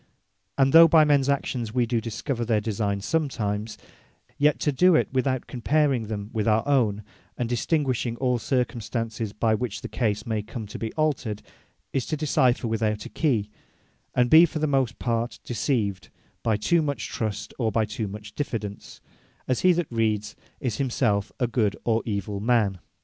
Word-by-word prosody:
And 135 -1 +3
though 165 +1 +10
by 160 -1 +6
mens 140 -2 +3
actions 125 -5 -1
wee 125 -1 +3
do 115 -1 0
discover 120 +2 -3
their 115 -2 +1
designee 105 -2 -2
sometimes; 110 -7 -2 0.6
yet 150 +1 +3
to 150 - +2
do 180 +6 +4
it - - +3
without 130 -1 0
comparing 135 -2 +1
them 105 0 -5
with 110 -1 -1
our 110 +3 +2
own, 110 -7 +2 0.3
and 120 - -1
distinguishing 125 -1 0
all 125 -1 +1
circumstances, 115 -3 -2
by 110 +1 +1
which 110 -1 -3
the - - -5
case 105 -3 -1
may 110 -2 -1
come 110 +2 -7
to 105 - -8
be 110 -1 -3
altered, 135 -9 -1 0.5
is 135 -3 -1
to 155 - -2
decypher 130 -5 +2
without 110 -1 -1
a - - -7
key, 115 -10 0 0.6
and 125 -1 +2
be 165 +2 +9
for 160 - -5
the 155 - 0
most 135 -5 0
part 115 0 -2
deceived, 110 -5 -1 0.3
by 110 -3 +1
too 165 +11 +2
much 140 -7 -2
trust, 110 -3 -4
or 115 -3 +1
by 110 0 +1
too 110 0 -4
much 105 +1 -9
diffidence; 110 -8 -5 0.5
as 130 - +1
he 185 - +5
that 175 -5 -1
reads, 110 -2 0 0.2
is 120 -5 -2
himselfe 115 -6 0
a 125 - +2
good 115 -4 0
or 115 -1 +1
evill 100 -1 -3
man. 105 -4 +1
115 Hz, 175 wpm, -25 LUFS, 105-135 Hz, 0.6 s, though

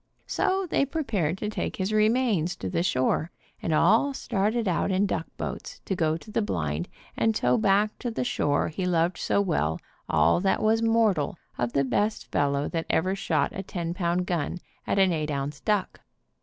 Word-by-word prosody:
So 380 0 0
they 295 - +2
prepared 225 - -1
to 210 - -3
bring - - -3
his 190 +2 -1
re 215 0 +4
mains 220 -9 +1
to 95 - -5
the - - +1
shore, 155 0 +1 0.3
and 165 - -2
all 230 - +4
started 220 -1 0
out 180 +1 +1
in 190 +1 +2
duck 165 -4 -2
boats - - -5
to 190 - -1
go 160 -2 +1
to 215 - -13
the 225 - +1
blind 80 - -2 0.3
and 225 -1 +1
tow - - +2
back 210 -1 +2
to 245 - -3
the 230 - -2
shore 145 -14 +1
he 180 +4 -3
loved 170 0 +1
so 200 - +1
well 80 - 0 0.3
all 80 - +4
that 190 +3 +1
was 220 +1 +3
mortal 225 -9 +2 0.2
of 120 0 -2
the 140 - +3
best 210 +10 -1
fellow 140 0 +1
that 165 -1 -3
ever 185 +3 +2
shot 165 -7 0
a 195 - -4
ten 170 -3 -4
pound 175 0 0
gun 175 -2 -2 0.3
at - - 0
an 190 -2 +4
eight 155 -2 -2
ounce 140 0 -3
duck. 210 -3 -1
185 Hz, 195 wpm, -26 LUFS, 155-215 Hz, 0.3 s, re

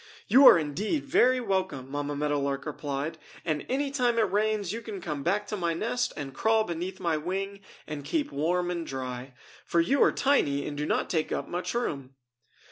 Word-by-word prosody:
"You 270 +2 +8
are - - +10
indeed 190 - -2
very 255 -1 +4
welcome," 190 - -2
Mamma 145 0 -2
Meadow 145 0 0
Lark 140 0 -2
replied, 150 +1 -4 0.3
"and 155 -3 -1
any 275 +2 0
time 245 -4 +1
it 220 -5 +2
rains 210 -2 0
you 230 - -4
can 215 -4 -6
come 150 -5 -4
back 200 +7 0
to 210 - -2
my 170 -4 -1
nest 235 +7 -1
and 140 -2 -5
crawl 220 +5 +3
beneath 180 +1 -4
my 170 -3 0
wing 195 +5 -3 0.3
and 150 -2 -6
keep 295 - -1
warm 175 +4 0
and 170 -1 -2
dry. 130 -2 -6 0.3
For 170 - +1
you 270 +12 +2
are - - +6
tiny 140 - +2
and 145 - -4
do 150 +1 -2
not - - +1
take 160 -3 -1
up - - -2
much 180 +6 -3
room!" 140 - -3
175 Hz, 200 wpm, -28 LUFS, 145-215 Hz, 0.3 s, are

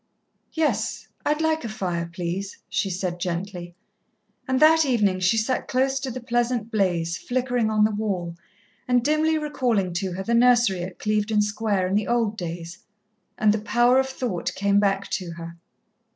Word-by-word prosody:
"Yes, 320 -2 -1 0.2
I'd 300 +1 +1
like 320 0 +1
a 230 - -4
fire, 175 -5 -3
please," 180 +3 -4
she 195 - -1
said 180 -1 -3
gently. 175 0 -4 0.7
And 260 0 +1
that 320 +1 +6
evening 210 -9 +2
she 185 +4 +2
sat 225 +4 0
close 265 +1 +1
to 265 0 -4
the 255 +1 -5
pleasant 240 -2 -1
blaze, 175 -5 0
flickering 245 -2 0
on 215 -1 +3
the 215 - +3
wall, 195 -5 -3 0.5
and 250 -1 +3
dimly 310 +1 +2
recalling 245 - 0
to 185 +1 -2
her 190 +2 -4
the 235 - -1
nursery 235 -6 +4
at 180 +1 -6
Clevedon 210 0 +1
Square 210 -2 0
in - - -2
the 210 0 +1
old 230 -3 +1
days, 170 -1 -6 0.6
and 210 -1 +4
the 215 - -2
power 240 +3 +3
of 265 0 0
thought 240 -9 -3
came 200 0 +2
back 200 -1 +1
to 180 -4 -3
her. 170 0 -9
210 Hz, 170 wpm, -24 LUFS, 185-245 Hz, 0.7 s, that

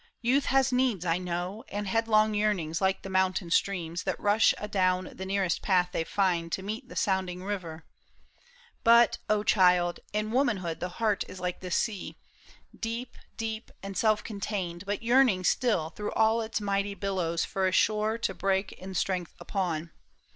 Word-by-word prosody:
Youth 265 +4 +3
has 265 0 +2
needs, 250 -8 +1
I 170 +1 +1
knov»'. 180 +4 -4
And 205 0 -4
headlong 215 +1 +3
yearnings 200 -6 0
like 190 0 +1
the - - -6
mountain 185 -1 +1
streams 175 -3 0
That - - -3
rush 210 +2 +4
adown 185 -3 0
the 190 - -7
nearest 190 -3 0
path 180 -2 +2
they 165 - -1
find 175 -3 0
To 190 - -2
meet 220 +6 -5
the - - -10
sounding 185 -2 -1
river; 175 -5 -5 1.0
but, 235 0 +6
oh 210 -1 +2
child. 180 -4 +3
In 215 +1 -2
womanhood 215 - 0
the 180 - -3
heart 215 -4 +1
is 185 - -9
like 180 0 -3
the 185 - -7
sea. 200 +2 -2 0.6
Deep, 230 +2 -5 0.2
deep, 225 0 -4
and 195 0 -6
self 215 +1 +2
contained, 195 -4 -4
but 205 +2 -2
yearning 235 -6 +4
still 180 -7 +1
Through 210 +2 -5
all 225 +1 +3
its 220 -1 -2
mighty 200 -1 -1
billows 180 -4 -1
for 190 -1 0
a - - +1
shore 215 +3 +2
To 230 - -2
break 195 0 0
in 190 0 -9
strength 180 -1 -1
upon. 170 -5 -2
195 Hz, 170 wpm, -28 LUFS, 180-215 Hz, 1.0 s, but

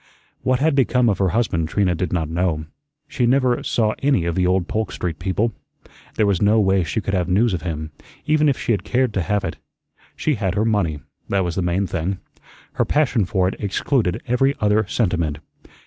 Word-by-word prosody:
What 130 0 +2
had 155 +1 +3
become 125 -3 +3
of 100 - 0
her 95 -2 +2
husband 85 -6 0
Trina 95 -2 +1
did 85 0 -3
not 85 -3 0
know. 80 -1 -1 0.4
She 120 -3 0
never 130 -1 +2
saw 110 -2 +1
any 135 -11 +2
of 85 - 0
the 90 +1 +1
old 90 -1 +1
Polk 110 0 -2
Street 85 -4 -4
people. 100 +5 0 0.6
There 110 - +2
was 100 -4 +1
no 105 +2 +4
way 95 -2 +3
she 85 +7 -2
could 95 - -3
have 90 -2 0
news 105 +4 +3
of 90 - -2
him, 80 -3 -4 0.3
even 155 -1 +3
if 135 - 0
she - - -2
had 100 -5 0
cared 125 +1 0
to 95 - 0
have 100 +4 0
it. 80 - -4 0.6
She 155 - 0
had 100 -7 -1
her 105 - +1
money, 90 -10 0 0.3
that 100 -1 +1
was 90 -2 -2
the 95 - -1
main 90 +3 0
thing. 90 +1 -2 0.6
Her - - +1
passion 135 -8 +2
for 90 0 +1
it 95 - -2
excluded 105 0 0
every 135 +3 +2
other 105 0 +2
sentiment. 85 -9 0
100 Hz, 210 wpm, -21 LUFS, 90-115 Hz, 0.6 s, no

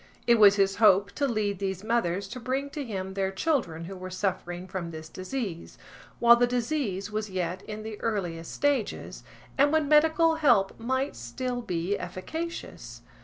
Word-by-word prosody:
It 235 -1 +5
was 205 -2 +8
his 195 -1 +2
hope 200 -2 +5
to 285 - 0
lead 210 -5 -1
these 190 -1 -3
mothers 200 -4 0
to 250 - -6
bring 265 +3 -2
to 295 -1 -4
him 190 -5 -5
their 190 0 -1
children 190 - -1
who 190 +3 -7
were 185 0 -7
suffering 185 -1 -3
from 185 -2 -4
this 160 -1 -8
disease, 185 -1 -5 0.4
while 235 0 +7
the 245 +1 +3
disease 235 -6 -2
was 215 0 -3
yet 185 0 -3
in 215 0 -5
the 220 -1 -7
earliest 175 -7 -2
stages, 285 -6 -1 0.4
and 285 +1 +5
when 315 -2 +2
medical 320 +2 +4
help 240 -11 +3
might 260 +4 -1
still 245 - -4
be 180 -2 -2
efficacious. 325 - -6
210 Hz, 170 wpm, -27 LUFS, 185-255 Hz, 0.4 s, was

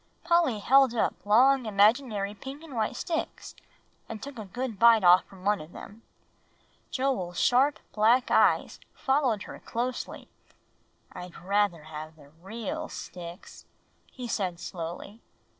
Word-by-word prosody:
Polly 340 -8 +2
held 260 +3 +4
up 225 - -1
long 255 +3 +5
imaginary 210 0 +2
pink 270 +8 -9
and 315 -4 -11
white 220 +2 -1
sticks, 325 +5 -4 0.6
and 225 - -6
took 270 -1 -9
a 215 - -6
good 235 +2 -5
bite 230 -2 +6
off 180 +1 +6
from 190 -1 -15
one 205 -2 +2
of 155 +3 -12
them. 215 +3 -11 0.9
Joel's 200 -10 -2
sharp 270 +4 +3 0.2
black 230 +4 +3
eyes - - +3 0.2
followed 265 -6 +1
her - - -10
closely. 245 +2 -4 0.8
"I'd 180 -1 -9
rather 195 -2 0
have 155 0 -9
the 145 -3 -18
real 235 - -5
sticks," 175 0 -10 0.4
he 250 -2 -7
said 185 -6 -2
slowly. 180 +6 -7
220 Hz, 135 wpm, -28 LUFS, 185-260 Hz, 0.9 s, bite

